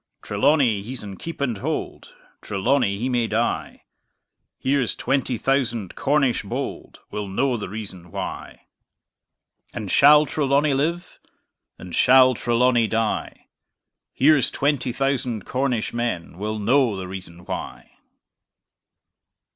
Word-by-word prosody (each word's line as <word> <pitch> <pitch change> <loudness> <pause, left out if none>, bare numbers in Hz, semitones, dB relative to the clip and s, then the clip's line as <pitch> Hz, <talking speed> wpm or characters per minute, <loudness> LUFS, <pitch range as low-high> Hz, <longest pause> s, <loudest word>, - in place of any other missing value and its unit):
Trelawny 120 -1 +2
he's 125 +4 -7
in 100 -2 -7
keep 165 - -7
and 120 -7 -1
hold; - - -4 0.3
Trelawny 100 +1 0
he 120 +5 -2
may 120 -3 +1
die: 115 +2 -2 0.7
Here's 135 -3 0
twenty 135 -2 -1
thousand 120 -7 -1
Cornish 140 -4 +1
bold 100 - -6
Will 105 -1 -4
know 125 +7 0
the 105 -5 -5
reason 95 -4 -8
why - - -7 1.1
And 105 -6 -4
shall 150 +2 +7
Trelawny 140 0 +1
live? 170 +6 -2 0.6
Or 90 - -10
shall 130 +4 +6
Trelawny 120 0 +2
die? 115 0 -2 0.7
Here's 145 0 +4
twenty 140 -3 0
thousand 125 -4 -1
Cornish 125 -3 -1
men 105 -8 -3
Will 110 +1 -3
know 115 0 +2
the 95 -1 -5
reason 90 -2 -9
why! - - -7
120 Hz, 115 wpm, -23 LUFS, 105-135 Hz, 1.1 s, shall